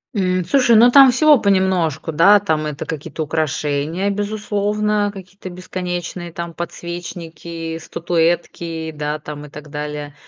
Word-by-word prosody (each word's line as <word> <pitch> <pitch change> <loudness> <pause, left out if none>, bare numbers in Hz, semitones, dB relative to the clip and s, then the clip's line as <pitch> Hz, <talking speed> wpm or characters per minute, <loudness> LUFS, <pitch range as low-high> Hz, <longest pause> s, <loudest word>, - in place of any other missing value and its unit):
М, 185 -2 +1
слушай, 250 +3 +3
ну, 235 +3 +7
там 275 0 +9
всего 295 +2 +5
понемножку, 185 -6 +1
да. 190 +7 +6
Там 160 -6 -1
это 150 -1 -5
какие-то 155 +1 -5
украшения 155 +3 -1
безусловно, 205 0 -1
какие-то 190 0 -10
бесконечные, 175 -1 -5
там, 170 0 -6
подсвечники, 170 -1 -6
статуэтки, 165 -1 -2
да, 150 0 -3
там, 150 -1 -8
и - - -12
так 150 +1 -11
далее, 150 0 -5
175 Hz, 130 wpm, -19 LUFS, 155-200 Hz, -, там